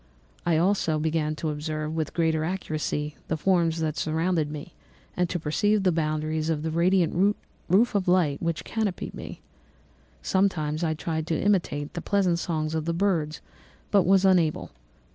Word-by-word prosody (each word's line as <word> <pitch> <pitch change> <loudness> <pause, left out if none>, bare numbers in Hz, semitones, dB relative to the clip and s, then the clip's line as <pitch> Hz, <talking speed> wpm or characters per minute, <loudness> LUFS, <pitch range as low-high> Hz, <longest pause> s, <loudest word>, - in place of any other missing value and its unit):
I 170 - +3
began 160 - +3
also 180 -5 +1
to 155 0 -1
observe, 155 +1 -3
with 160 -1 -3
greater 160 -2 +1
accuracy, 155 -4 -3
the 160 - -1
forms 165 -1 +2
that 155 -1 -1
surrounded 160 0 0
me 150 +3 -8 0.4
and 180 -1 0
to - - -1
perceive 205 +7 +1
the 185 - +4
boundaries 155 0 -1
of 155 -2 -1
the 160 - -2
radiant 180 +3 +2 0.3
roof 210 +7 +4
of 200 -3 0
light 175 -6 +2
which 170 -1 -2
canopied 215 -5 -3
me. - - -8 0.8
Sometimes 170 -5 0
I 160 -1 0
tried 160 0 -3
to 160 -2 0
imitate 170 -8 0
the 175 - -4
pleasant 185 -4 +1
songs 155 -2 -2
of 160 -1 -2
the 170 0 -1
birds 165 -5 0 0.5
but 200 - +5
was 195 0 +5
unable. 175 -5 +2
165 Hz, 160 wpm, -26 LUFS, 155-185 Hz, 0.8 s, but